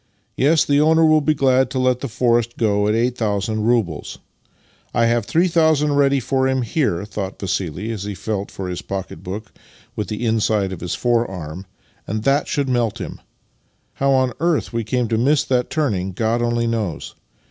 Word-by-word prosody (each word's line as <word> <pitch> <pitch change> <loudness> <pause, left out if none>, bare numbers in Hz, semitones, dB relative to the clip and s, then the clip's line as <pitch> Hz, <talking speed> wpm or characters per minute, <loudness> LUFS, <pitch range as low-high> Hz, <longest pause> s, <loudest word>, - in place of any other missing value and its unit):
Yes. 155 +4 +3
the 145 0 +3
owner 160 +1 +4
will 155 -1 +5
be 155 +1 +1
glad 130 -2 +3
to 130 - -4
let 130 -1 +2
the 140 - -4
forest 120 0 +1
go 105 -2 +1
at 105 - +2
8000 110 -3 0
roubles. 110 -11 0 0.8
I 115 - +3
have 115 -2 +1
3000 160 -4 +3
ready 140 -1 +3
for 130 +1 0
him 130 -1 0
here," 110 - -1
thought 100 -2 -5
Vassili 95 +1 -3
as 110 -4 -5
he 105 -1 -4
felt 100 +1 -3
for 95 - -6
his 90 -1 -4
pocket 95 -1 -6
book 100 +3 -7 0.4
with 105 - -3
the 105 +4 -3
inside 110 -3 +1
of 90 - -8
his 90 -1 -3
fore 120 -2 +1
arm; 90 0 -7 0.2
" - - -36
and 110 +1 -3
that 140 +3 +2
should 140 -1 -1
melt 120 -4 0
him. - - -7 0.7
How 140 - 0
on 130 -2 +2
earth 165 -6 0
we 115 0 -1
came 120 +2 -1
to 110 0 0
miss 140 +4 +3
that 125 -2 0
turning 100 - -1
God 115 +4 0
only 120 0 0
knows. 110 -9 -3
115 Hz, 190 wpm, -20 LUFS, 105-135 Hz, 0.8 s, will